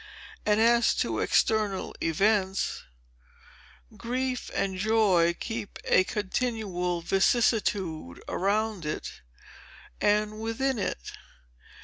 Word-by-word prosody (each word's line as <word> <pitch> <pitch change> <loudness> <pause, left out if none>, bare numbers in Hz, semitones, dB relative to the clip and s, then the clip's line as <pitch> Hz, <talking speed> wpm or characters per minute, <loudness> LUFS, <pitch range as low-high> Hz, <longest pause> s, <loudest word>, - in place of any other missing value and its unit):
And 210 0 +3
as 235 +1 +4
to - - -1
external 215 -3 +1
events, 195 +3 +1 1.1
Grief 255 +1 -3
and 190 -1 0
Joy 190 -5 +3
keep 225 -3 -5
a 185 - +5
continual 195 -5 -2
vicissitude 195 - +1
around 205 0 0
it 150 0 -5 0.8
and 210 +1 +1
within 230 +3 -1
it. 120 - -3
210 Hz, 85 wpm, -27 LUFS, 185-225 Hz, 1.1 s, a